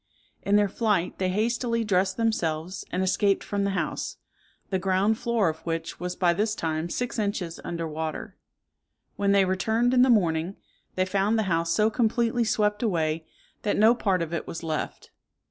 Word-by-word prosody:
In 200 Hz, -, +1 dB
their 205 Hz, 0 st, +4 dB
flight 200 Hz, -3 st, 0 dB
they 185 Hz, -1 st, +1 dB
hastily 230 Hz, +3 st, 0 dB
dressed 190 Hz, -2 st, +1 dB
themselves, 180 Hz, -6 st, -1 dB
and 185 Hz, -, 0 dB
escaped 195 Hz, +1 st, +2 dB
from 200 Hz, -1 st, -1 dB
the -, -, +1 dB
house, -, -, -3 dB, 0.5 s
the 190 Hz, -, +1 dB
ground 195 Hz, +4 st, +1 dB
floor 235 Hz, -5 st, +1 dB
of 160 Hz, 0 st, -2 dB
which 165 Hz, -1 st, -4 dB
was 180 Hz, 0 st, -4 dB
by 175 Hz, -2 st, +3 dB
this 215 Hz, +4 st, 0 dB
time 160 Hz, -1 st, -2 dB
six 245 Hz, +4 st, -3 dB
inches 200 Hz, -5 st, -2 dB
under 165 Hz, -1 st, -3 dB
water. 160 Hz, 0 st, -5 dB, 0.8 s
When 200 Hz, 0 st, +1 dB
they 200 Hz, -1 st, +5 dB
returned 220 Hz, +6 st, +1 dB
in 250 Hz, -, +5 dB
the 260 Hz, -, +5 dB
morning, 175 Hz, -4 st, +2 dB, 0.4 s
they 185 Hz, -, +2 dB
found 200 Hz, +3 st, +1 dB
the 220 Hz, -, +2 dB
house 165 Hz, -3 st, 0 dB
so 215 Hz, +4 st, +3 dB
completely 235 Hz, 0 st, +1 dB
swept 210 Hz, -2 st, +1 dB
away, 160 Hz, -7 st, 0 dB, 0.3 s
that 205 Hz, -, 0 dB
no 220 Hz, +3 st, +6 dB
part 195 Hz, -7 st, 0 dB
of 165 Hz, 0 st, -6 dB
it 170 Hz, -, -3 dB
was 165 Hz, -, -6 dB
left. 155 Hz, -2 st, -4 dB
195 Hz, 180 wpm, -26 LUFS, 170-220 Hz, 0.8 s, no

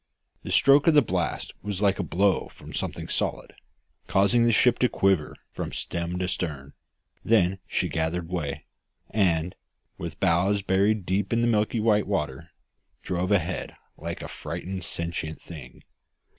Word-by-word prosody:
The -, -, -6 dB
stroke 140 Hz, +2 st, +5 dB
of 165 Hz, -, +6 dB
the 145 Hz, -, +7 dB
blast 90 Hz, -6 st, -2 dB
was 100 Hz, -2 st, -3 dB
like 100 Hz, -1 st, +3 dB
a -, -, 0 dB
blow 95 Hz, +4 st, +1 dB
from -, -, -13 dB
something -, -, -3 dB
solid, -, -, -2 dB, 0.5 s
causing 110 Hz, +5 st, +3 dB
the 120 Hz, -, +4 dB
ship 125 Hz, +2 st, +4 dB
to 125 Hz, -, +3 dB
quiver 95 Hz, -6 st, +1 dB, 0.2 s
from -, -, -5 dB
stem 85 Hz, +1 st, -3 dB
to 90 Hz, 0 st, -1 dB
stern; 75 Hz, -6 st, -4 dB, 0.5 s
then 95 Hz, -4 st, +3 dB
she -, -, 0 dB
gathered 80 Hz, +1 st, -2 dB
way, 75 Hz, -5 st, -4 dB, 0.5 s
and, 90 Hz, -4 st, +1 dB, 0.5 s
with -, -, -6 dB
bows 95 Hz, +4 st, +2 dB
buried 100 Hz, +1 st, +2 dB
deep 95 Hz, +2 st, 0 dB
in 115 Hz, 0 st, +2 dB
the 120 Hz, -, +2 dB
milk 110 Hz, -2 st, +2 dB
white 110 Hz, -2 st, +2 dB
water, 80 Hz, -5 st, -2 dB, 0.5 s
drove 90 Hz, +1 st, -1 dB
ahead 95 Hz, -2 st, 0 dB, 0.2 s
like 85 Hz, +2 st, -6 dB
a -, -, -5 dB
frightened 95 Hz, 0 st, -6 dB
sentient 85 Hz, -2 st, -4 dB
thing. 75 Hz, -7 st, -11 dB
95 Hz, 155 wpm, -26 LUFS, 85-105 Hz, 0.5 s, the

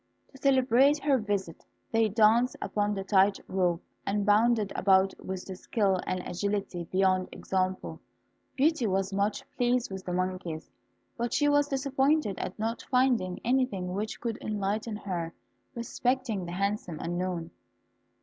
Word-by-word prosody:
To 270 Hz, -, -14 dB
celebrate 265 Hz, +1 st, +4 dB
her 280 Hz, -3 st, +3 dB
visit, 200 Hz, -6 st, -3 dB, 0.3 s
they 225 Hz, -2 st, +3 dB
danced 225 Hz, +4 st, +4 dB
upon 205 Hz, 0 st, -1 dB
the 195 Hz, -, -3 dB
tight 195 Hz, 0 st, +3 dB
rope, 180 Hz, -2 st, 0 dB, 0.2 s
and 205 Hz, 0 st, -1 dB
bounded 215 Hz, 0 st, +3 dB
about 190 Hz, 0 st, +4 dB
with 190 Hz, -1 st, -5 dB
a 190 Hz, -, -6 dB
skill 195 Hz, -1 st, 0 dB
and 185 Hz, 0 st, -1 dB
an -, -, -9 dB
agility 195 Hz, -1 st, -2 dB
beyond 185 Hz, +1 st, +1 dB
example. 185 Hz, 0 st, -2 dB, 0.6 s
Beauty 290 Hz, -3 st, +2 dB
was 195 Hz, 0 st, 0 dB
much 200 Hz, +1 st, 0 dB
pleased 245 Hz, -2 st, +1 dB
with 190 Hz, -1 st, -6 dB
the 180 Hz, -, -4 dB
monkeys, 185 Hz, -3 st, -3 dB, 0.5 s
but 235 Hz, 0 st, -2 dB
she 290 Hz, -, +3 dB
was 290 Hz, 0 st, +4 dB
disappointed 275 Hz, -4 st, +1 dB
at 185 Hz, -, -4 dB
not 225 Hz, +2 st, -2 dB
finding 250 Hz, -8 st, +2 dB
anything 240 Hz, -8 st, 0 dB
which 210 Hz, +3 st, -3 dB
could 230 Hz, -2 st, -3 dB
enlighten 210 Hz, +1 st, -2 dB
her 175 Hz, -5 st, -4 dB, 0.4 s
respecting 235 Hz, -3 st, -1 dB
the -, -, -5 dB
handsome 200 Hz, -3 st, -2 dB
unknown. 175 Hz, 0 st, -3 dB
205 Hz, 145 wpm, -29 LUFS, 185-240 Hz, 0.6 s, celebrate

